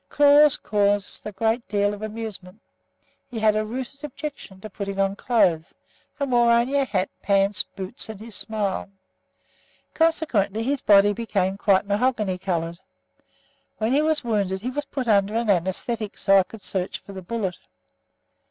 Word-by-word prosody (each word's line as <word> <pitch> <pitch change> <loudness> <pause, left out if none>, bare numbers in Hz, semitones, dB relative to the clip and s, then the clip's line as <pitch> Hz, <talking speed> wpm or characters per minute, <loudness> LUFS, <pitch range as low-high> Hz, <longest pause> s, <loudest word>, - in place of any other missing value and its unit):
Claude 290 0 +5
caused 205 -1 0
a - - -5
good 225 +4 -1
deal 205 0 +1
of 205 - -8
amusement. 215 -3 -7 0.7
He 245 - -8
had 215 -1 +3
a 215 - +1
rooted 260 +5 -6
objection 285 -9 -7
to 215 - -7
putting 200 -1 -5
on 195 0 +1
clothes 180 -9 +1 0.4
and 280 -2 -1
wore 240 -1 +4
only 235 +4 +2
a 275 - +2
hat, 195 -5 -1
pants, 195 -1 +2
boots 195 +4 -7
and 215 -3 -7
his 225 +1 -10
smile. 205 -3 -3 1.0
Consequently 245 - +1
his 275 +2 -1
body 205 0 +5
became 200 -4 -1
quite 195 -1 +2
mahogany 205 -2 0
coloured. 170 -2 -2 1.0
When 220 +2 0
he 280 +3 +3
was 310 -2 +1
wounded 200 -5 -1
he 250 +4 -3
was 290 +2 -3
put 265 -3 -4
under 205 -1 +3
an 230 -1 0
anæsthetic 200 +4 -1
so 195 - -1
that 195 - +8
I - - +3
could 225 - -11
search 185 -1 -3
for 200 - -13
the 190 - -7
bullet. 190 -1 -3
210 Hz, 165 wpm, -24 LUFS, 195-240 Hz, 1.0 s, that